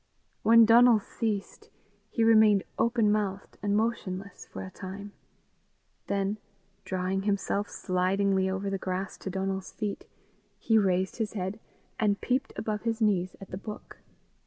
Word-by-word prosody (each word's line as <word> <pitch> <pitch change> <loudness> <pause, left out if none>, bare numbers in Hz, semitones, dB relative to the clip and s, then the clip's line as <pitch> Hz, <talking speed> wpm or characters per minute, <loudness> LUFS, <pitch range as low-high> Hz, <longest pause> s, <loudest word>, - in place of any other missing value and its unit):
When 230 0 +7
Donal 235 0 +7
ceased, 210 -1 -4 0.4
he 230 - 0
remained 215 -3 +6 0.2
open 230 -2 +3
mouthed 200 -2 -2
and 205 0 +1
motionless 200 -4 -3
for - - -7
a 190 - -8
time; 200 +2 -8 1.0
then, 200 +1 -1 0.4
drawing 185 +1 -1
himself 200 0 -1
slidingly 190 +1 +1
over 190 +1 -2
the 195 - -2
grass 185 +1 -3
to - - -5
Donal's 190 0 -3
feet, 210 -2 -4 0.5
he 225 -1 +3
raised 190 -2 +1
his 220 -2 -2
head 190 +1 -3 0.4
and 205 -2 +2
peeped 265 +2 -1
above 215 -1 -3
his 230 -1 -1
knees 190 -5 +1
at 195 - -11
the 185 - -4
book. 210 0 -9
200 Hz, 140 wpm, -28 LUFS, 190-220 Hz, 1.0 s, When